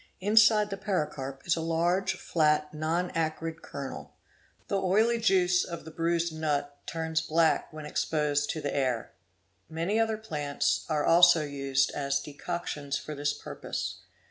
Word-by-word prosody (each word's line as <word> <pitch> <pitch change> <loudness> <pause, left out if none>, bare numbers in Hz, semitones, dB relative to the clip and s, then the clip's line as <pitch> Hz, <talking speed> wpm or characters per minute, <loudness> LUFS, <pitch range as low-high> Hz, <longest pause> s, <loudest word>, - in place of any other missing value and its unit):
Inside 210 +1 +5
the 195 - -3
pericarp 150 -9 -3
is 175 - +2
a 165 - -3
large 170 +4 +1
flat 150 -2 +1
non 165 +4 -1
acrid 165 0 -2
kernel."' 140 -2 -7 0.5
_ - - -41
The 195 -1 0
oily 220 +5 +3
juice 180 -5 +3
of 170 -3 -7
the 160 - -9
bruised 170 0 0
nut 145 -2 -1
turns 160 -1 -1
black 165 0 +2
when 155 -1 -8
exposed 150 -1 0
to 155 - -2
the 145 - -3
air. 130 -5 -1 0.6
Many 170 +7 -1
other 225 -1 +1
plants 150 -10 -1
are 150 -2 +1
also 170 -1 +6
used 140 -2 0
as 140 -1 -1
decoctions 145 -1 -4
for 155 - -7
this 145 0 -1
purpose. - - -5
160 Hz, 150 wpm, -29 LUFS, 145-180 Hz, 0.6 s, also